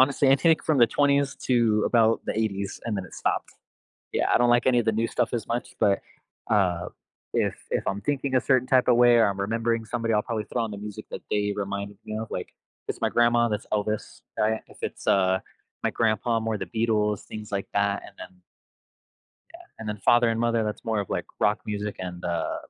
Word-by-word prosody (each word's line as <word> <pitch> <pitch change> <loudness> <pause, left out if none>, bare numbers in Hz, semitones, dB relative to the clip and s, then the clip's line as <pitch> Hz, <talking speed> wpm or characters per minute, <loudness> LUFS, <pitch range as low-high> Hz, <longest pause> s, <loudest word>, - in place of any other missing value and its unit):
honestly, 135 +1 +4
anything 145 +4 +5
from 155 -3 +2
the 120 - +7
20s, 140 +2 +2
to 115 -4 +3
about 115 -1 +3
the - - -1
80s, 100 -3 -2
and 115 -3 -2
then 95 - -3
it 95 - -12
stopped. - - -1 0.6
Yeah, - - +1
I - - +5
don't 120 0 +4
like 120 0 +3
any 125 -2 +4
of 120 - +1
the 110 - +2
new 110 +2 0
stuff 120 -2 0
as 115 -3 -2
much, 120 +1 -3
but, 100 -1 +3 0.5
uh, 90 -5 +2 0.5
if - - +1
if - - -1
I'm 100 - -2
thinking 135 +1 -1
a - - +4
certain 130 -1 +2
type 130 -1 +4
of 125 - +6
way 120 0 +6
or 115 -1 +5
I'm 100 0 -3
remembering 115 +2 0
somebody, 115 0 -1
I'll 105 - +2
probably 110 -2 -3
throw 120 - 0
on 115 - -3
the 100 - -6
music 105 0 -8
that - - -6
they 105 0 +1
reminded 100 0 -4
me 110 - -5
of, 110 +1 -5
like, - - -4 0.4
it's - - -4
my - - +2
grandma, 120 0 +3
that's 105 +1 -3
Elvis, 105 0 -2 0.2
right? 110 +1 +1
If - - -17
it's, - - -5
uh, 95 -1 +3 0.4
my - - +1
grandpa, 115 +1 +1
more 110 -1 -1
the - - -3
Beatles 110 -3 0
things 110 -1 -8
like 100 -1 -2
that, 100 0 +1
and - - -13
then 90 0 -11 1.1
Yeah, - - -13 0.2
and 110 -1 -6
then 105 -1 -3
father 120 0 +5
and 115 - -1
mother, 115 -1 +1
that's 105 +2 -4
more 110 -2 0
of, 100 - -6
like, - - -2
rock 105 +2 +2
music, 105 0 -3
and, 90 -1 -6
uh, 85 -2 -1
110 Hz, 220 wpm, -26 LUFS, 105-120 Hz, 1.1 s, the